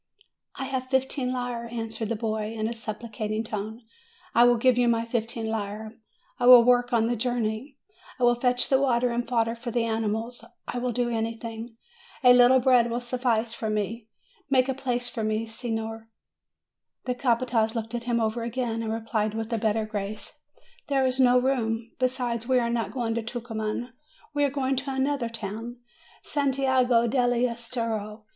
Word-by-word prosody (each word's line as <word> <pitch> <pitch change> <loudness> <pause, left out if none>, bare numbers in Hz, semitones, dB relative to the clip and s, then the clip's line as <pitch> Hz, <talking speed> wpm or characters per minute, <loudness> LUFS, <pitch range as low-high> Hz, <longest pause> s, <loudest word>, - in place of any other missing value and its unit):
"I 265 - -4
have 260 -1 -3
fifteen 265 -1 0
lire," 245 -2 -3
answered 225 -2 -4
the 230 - 0
boy 220 0 -2
in 220 0 -1
a - - -2
supplicat 215 -1 -5
ing 215 +1 -1
tone; 220 +2 -5 0.5
"I 235 +1 +6
will 245 0 +5
give 255 +1 +4
you 245 0 +3
my 230 -1 +2
fifteen 230 -1 -3
lire. 215 0 -4 0.5
I 245 - +2
will 250 -1 +10
work 245 +1 +3
on 230 -2 +3
the 240 +1 0
journey; 240 +2 -2 0.4
I - - -1
will 240 0 +6
fetch 245 +1 +1
the 265 0 +3
water 250 -2 +2
and 240 +1 -2
fodder 230 -2 +1
for 235 +1 -6
the 235 0 0
animals; 225 +1 -2 0.2
I 245 - -3
will 250 0 -1
do 240 0 0
anything. 225 0 -4 0.5
A 250 -1 +9
little 245 +1 +7
bread 250 -2 +4
will 235 +1 -1
suffice 240 -2 -1
for 220 -1 -3
me. 215 +2 -2 0.4
Make 260 -1 +4
a 265 - 0
place 245 -2 -2
for 235 -2 -4
me, 215 +1 0
signer." 225 -1 -5 1.0
The 250 - 0
capataz 240 -2 +1
looked 225 0 -4
him 240 0 -1
over 225 +1 0
again, 235 -1 -2
and 220 -1 -2
replied 220 -1 -1
with 225 +1 -3
a 225 - 0
better 220 0 +1
grace, 210 -1 -5 0.5
"There 270 -2 +2
is 260 0 0
no 250 -1 +6
room; 235 -3 -1
besides, 250 -2 -1
we 260 -1 +3
are 235 -1 +1
not 230 -4 -1
going 235 -2 -1
to 230 - -1
Tucuman; 225 0 -4 0.4
we 290 0 +1
are - - +2
going 270 -1 -1
to 270 0 -3
another 265 -2 0
town, 230 +2 -6 0.5
Santiago 260 -4 +2
dell' 245 +1 +2 0.2
Estero. 230 -3 -4
235 Hz, 180 wpm, -26 LUFS, 225-250 Hz, 1.0 s, will